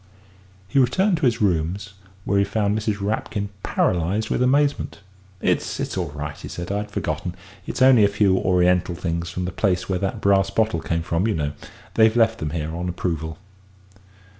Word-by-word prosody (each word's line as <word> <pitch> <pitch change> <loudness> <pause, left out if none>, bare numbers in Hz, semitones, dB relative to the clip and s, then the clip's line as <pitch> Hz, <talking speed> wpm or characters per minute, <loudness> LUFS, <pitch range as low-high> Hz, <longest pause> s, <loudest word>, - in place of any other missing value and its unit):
He 105 - +2
returned 180 - +3
to 145 - +2
his 115 -2 +1
rooms, 95 +2 0 0.3
where 100 0 +2
he - - +4
found 100 0 0
Mrs. 105 -1 -1
Rapkin 100 0 -2
paralysed 95 +6 0
with - - +1
amazement. 140 +3 +2 0.4
"It's - - 0
it's - - -3
all - - -2
right," 75 0 -5
he - - -9
said; 85 +2 -6
"I'd 105 +1 -2
forgotten - - -3 0.3
it's 130 - 0
only 130 -4 +7
a - - +6
few 100 -1 +2
Oriental 90 -1 +2
things 85 -1 -3
from 90 +1 -3
the 90 - -3
place 90 -1 0
where 95 -2 -1
that 95 -1 -2
brass 95 -1 +3
bottle 110 -3 +1
came 85 0 -1
from, 85 +5 0
you 110 - 0
know. 75 -2 -1 0.4
They've 110 0 +4
left 115 -2 +3
them 75 - -2
here 80 0 -3
on 90 +1 -3
approval." 80 -3 -3
100 Hz, 185 wpm, -23 LUFS, 85-110 Hz, 0.4 s, only